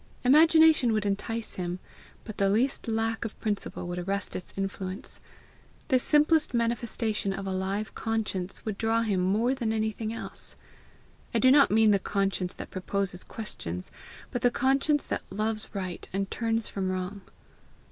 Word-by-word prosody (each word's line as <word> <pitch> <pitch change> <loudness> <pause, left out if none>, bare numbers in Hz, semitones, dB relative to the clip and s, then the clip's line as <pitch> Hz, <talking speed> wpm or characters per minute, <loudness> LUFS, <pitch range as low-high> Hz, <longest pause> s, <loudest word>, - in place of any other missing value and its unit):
Imagination 315 -2 +6
would 215 -1 0
entice 220 +3 -2
him, 180 -1 -2 0.5
but 215 - -8
the 195 -1 +3
least 240 +7 +1
lack 225 0 0
of 225 - -6
principle 205 -4 -3
would 175 0 -3
arrest 195 +2 -3
its 180 - -6
influence. 195 +3 -5 0.7
The 260 -3 +4
simplest 300 0 +3
manifestation 230 -3 0
of 195 0 -5
a 190 - -2
live 195 +3 -2
conscience 210 -5 -1
would 215 -3 -3
draw 225 +1 +2
him 205 -4 0
more 210 +8 +2
than 240 -5 -1
anything 220 0 -1
else. 230 - -6 0.8
I - - +5
do 260 - +5
not 280 0 +6
mean 220 0 +5
the 200 - +4
conscience 195 -2 -1
that - - -8
proposes 185 -1 -2
questions, 90 - -5 0.4
but 245 - -2
the 245 - +5
conscience 275 +4 +2
that - - -3
loves 215 +2 -2
right 185 -3 -5
and 195 0 -2
turns 225 -1 0
from 190 -2 -2
wrong. 185 +2 -3
215 Hz, 155 wpm, -28 LUFS, 195-235 Hz, 0.8 s, Imagination